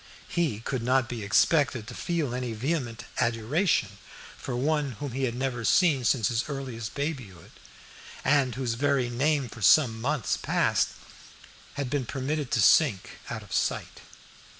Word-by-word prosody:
He 155 -12 -1
could 130 +1 -3
not 130 +1 +2
be 120 -2 -5
expected 130 +4 +2
to 125 - -9
feel 160 -3 -2
any 125 -2 -3
vehement 120 -1 -3
adoration 115 - +1 0.4
for 125 - -5
one 145 +1 0
whom 140 +5 -6
he 135 +2 -1
had 120 -2 -2
never 125 -2 -2
seen 150 -2 +3
since 115 -3 +2
his 115 0 -1
earliest 130 -6 -5
babyhood, 130 - -5 0.7
and 130 -3 +3
whose 125 -2 -1
very 135 -1 +1
name 140 +2 +1
for 115 - -11
some 115 +1 +5
months 140 -1 0
past - - +1 0.9
had 140 -3 -3
been 140 -5 -1
permitted 140 +1 -2
to 120 - +1
sink 120 - +3
out 110 -2 -5
of 100 - -11
sight. - - -1
130 Hz, 150 wpm, -27 LUFS, 115-145 Hz, 0.9 s, some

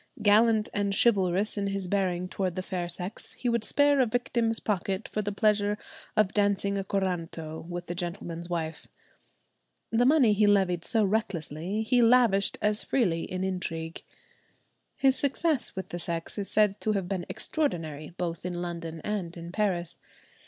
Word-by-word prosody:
Gallant 215 +1 +5
and 200 -1 0
chivalrous 200 -2 +3
in 200 - -1
his 195 -1 -2
bearing 185 -2 0
towards 185 -1 -2
the 185 - -3
fair 180 -3 -3
sex, 180 +4 -5
he 245 - -2
would 235 -2 +1
spare 285 +3 +4
a 255 - +4
victim's 235 -1 0
pocket 195 -2 -2
for 215 - -2
the 205 0 -2
pleasure 210 0 +2 0.4
of 215 -2 +3
dancing 200 -1 +1
a 195 - -1
corranto 170 -5 -3
with 175 0 -5
the 175 - -4
gentleman's 175 -1 -5
wife. 160 -3 -4 1.0
The 240 +2 +3
money 265 -7 +5
he 205 0 +3
levied 190 -4 +3
so 220 +3 +2
recklessly 195 -1 -2
he 245 +2 +3
lavished 230 -4 +4
as 210 0 +2
freely 180 -11 0
in 185 0 -2
intrigue. 165 -3 -3 0.9
His 265 -1 +3
success 285 0 0
with 190 - -5
the 175 - -5
sex 165 0 -3
is 200 - -3
said 210 -2 +3
to 215 - +1
have 195 -3 -1
been 185 -2 -3
extraordinary, 160 - -1
both 170 -2 -3
in 180 0 -3
London 170 -2 -5
and 185 -5 -3
in 170 0 -7
Paris. 185 -4 -1
195 Hz, 165 wpm, -28 LUFS, 175-215 Hz, 1.0 s, Gallant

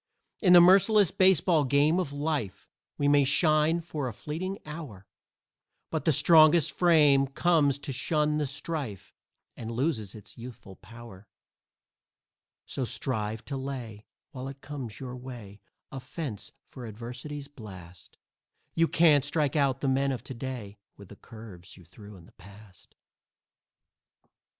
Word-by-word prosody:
In 180 -4 +5
the 175 - +10
merciless 195 +2 +5
baseball 185 -4 +3
game 145 +5 +2
of 175 -7 -3
life 145 -10 -3 0.3
We 145 - 0
may 145 0 +4
shine 155 +3 +2
for 155 -5 -5
a 120 - -5
fleeting 175 - -5
hour, 150 - -9 0.9
But 160 - -3
the 160 - +4
strongest 155 +1 +5
frame 150 -6 +4
comes 145 -1 +2
to 140 -1 -6
shun 150 +3 0
the 150 - -1
strife 140 - -6 0.4
And 115 - -7
loses 115 - -2
its 110 +2 -13
youthful 115 -5 -11
power. 115 -2 -14 1.4
So 135 - -3
strive 110 -2 -3
to 140 - -5
lay, 125 -6 -7 0.2
while 130 -3 -7
it 135 0 -10
comes 135 -7 -8
your 125 -2 -7
way, 120 -6 -10 0.3
A 135 - -6
fence 140 - -7
for 125 -3 -11
Adversity's 125 +6 -7
blast. 95 -10 -13 0.6
You 165 0 +2
can't 155 -5 +4
strike 145 0 -1
out 135 -3 +1
the 140 - -1
men 135 +1 +1
of 125 -3 -5
to 135 - -8
day 115 -5 -7 0.2
With 100 -3 -14
the - - -12
curves 110 -8 -13
you 90 - -16
threw 100 +4 -14
in 85 -3 -15
the - - -20
past. 100 -1 -18
135 Hz, 145 wpm, -28 LUFS, 110-150 Hz, 1.4 s, the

